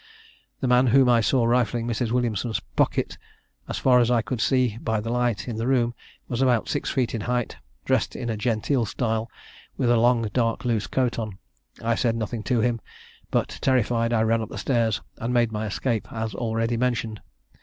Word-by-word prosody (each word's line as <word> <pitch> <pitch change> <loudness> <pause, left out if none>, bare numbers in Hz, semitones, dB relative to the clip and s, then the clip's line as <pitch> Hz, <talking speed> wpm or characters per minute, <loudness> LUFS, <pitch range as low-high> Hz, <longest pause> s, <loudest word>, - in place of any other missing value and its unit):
The 130 - 0
man 125 +1 +4
whom 130 +2 +5
I 120 -1 +5
saw 120 +3 +2
rifling 120 -1 +1
Mrs. 120 0 -1
Williamson's 115 -2 0 0.2
pocket, - - 0 0.5
as - - -3
far 125 -1 +4
as 120 -1 +3
I 120 -2 +2
could 115 +3 -3
see 125 -4 +2
by 110 -2 0
the 115 +2 -4
light 120 -3 0
in 115 -3 -4
the 115 +2 -2
room, 120 -3 +2 0.3
was 120 0 -2
about 125 -4 +2
six - - -2
feet 125 -4 0
in 115 - -2
height, 125 +1 -2 0.3
dressed - - +1
in 120 - -4
a 115 - -1
genteel 115 +2 0
style, 115 +1 -1 0.5
with 120 - +2
a 120 - +4
long 120 0 +3
dark 115 -1 0
loose 115 -4 0
coat 125 -3 0
on. 110 -4 -5 0.5
I 115 +1 +2
said 115 0 +1
nothing 115 0 -3
to 125 -3 +2
him; 120 -1 0 0.5
but, - - -1
terrified, 120 -2 +2
I 110 -2 +3
ran 115 0 +2
up 110 - -6
stairs, 115 -5 +1 0.2
and 120 +2 -2
made 120 -2 +3
my 110 0 -3
escape 115 +2 -2
as 110 -2 -3
already 115 +1 -1
mentioned. 115 -3 -1
115 Hz, 195 wpm, -25 LUFS, 110-125 Hz, 0.5 s, whom